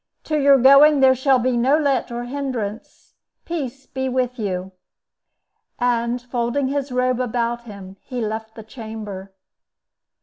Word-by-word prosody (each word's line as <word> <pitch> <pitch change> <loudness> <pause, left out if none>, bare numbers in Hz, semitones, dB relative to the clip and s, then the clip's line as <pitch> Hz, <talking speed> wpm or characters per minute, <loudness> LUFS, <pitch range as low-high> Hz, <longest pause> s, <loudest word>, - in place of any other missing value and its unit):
To 305 -1 -1
your 280 -1 +6
going 275 +3 +7
there 265 -1 +6
shall 260 +1 +3
be 250 0 0
no 260 +5 +3
let 280 -6 0
or 240 0 -4
hindrance. 245 -5 -5 0.3
Peace 275 -6 -5
be 265 0 -3
with 250 -1 -1
you!" 190 -3 -3 1.1
And, 240 0 0
folding 245 +2 -2
his 280 -1 -2
robe 250 0 0
about 240 -1 -2
him, 195 -3 -11
he 250 -2 -6
left 220 0 -4
the 220 - -9
chamber. 215 -4 -8
245 Hz, 140 wpm, -21 LUFS, 225-270 Hz, 1.1 s, going